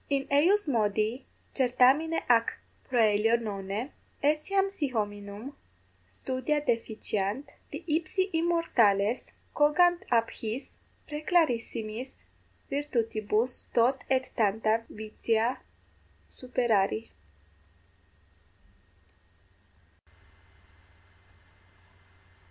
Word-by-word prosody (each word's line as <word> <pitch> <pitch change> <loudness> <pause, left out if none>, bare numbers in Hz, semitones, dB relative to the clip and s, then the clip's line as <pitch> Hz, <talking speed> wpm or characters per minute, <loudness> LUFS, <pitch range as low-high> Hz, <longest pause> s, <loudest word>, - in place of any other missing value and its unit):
In 275 -1 0
eius 355 +8 +4
modi 220 0 0 0.3
certamine 270 +5 +3
ac 230 -2 +4 0.4
proelio 225 -2 +3
nonne, 205 +3 -4 0.3
etiam 310 +7 +2
si 355 -7 -2
hominum 205 +2 -4 0.5
studia 255 - -2
deficiant, 225 -2 -2 0.2
di 295 +4 -7
ipsi 340 +5 0
immortales 250 - +2 0.3
cogant 350 +5 +4
ab 230 -1 +3
his 225 +4 -6 0.3
praeclarissimis 260 -7 -1 0.5
virtutibus 235 -4 -1
tot 250 +3 +3
et 260 -1 +1
tanta 220 +1 +1
vitia 220 +3 -1 0.7
superari? 215 - 0
245 Hz, 65 wpm, -29 LUFS, 215-295 Hz, 0.7 s, eius